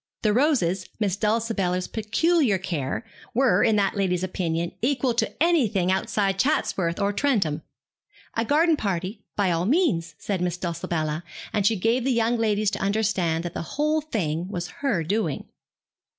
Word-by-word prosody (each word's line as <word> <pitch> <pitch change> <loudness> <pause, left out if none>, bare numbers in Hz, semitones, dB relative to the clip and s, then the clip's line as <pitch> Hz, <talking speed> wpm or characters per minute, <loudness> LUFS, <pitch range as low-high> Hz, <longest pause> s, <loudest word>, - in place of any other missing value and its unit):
The 210 -2 +3
roses, 205 - +1
Miss 200 -4 +1
Dulcibella's 210 -4 0
peculiar 230 - +2
care, 170 - -3 0.3
were, 255 0 +4
in 220 - +4
that 200 -1 +1
lady's 185 -3 0
opinion, 170 -2 -2
equal 255 0 +1
to 235 - 0
anything 235 - +2
outside 195 0 0
Chatsworth 185 - +1
or 200 0 +1
Trentham. 200 - +1 0.7
A 230 - 0
garden 315 +6 +3
party, 195 -1 -3
by 195 -3 +2
all 170 +2 0
means, 220 - +1
said 195 -3 -3
Miss 180 -1 -1
Dulcibella, 165 -3 -2 0.3
and 200 -2 +2
she 225 - +3
gave 230 +5 +1
the 265 - +1
young 235 0 +2
ladies 215 -2 +1
to - - -3
understand 195 -5 0
that 175 -1 -5
the - - -3 0.2
whole 305 +1 +2
thing 180 - -2
was 180 -3 -4
her 240 -13 +1
doing. 175 -3 -1
200 Hz, 155 wpm, -25 LUFS, 175-235 Hz, 0.7 s, were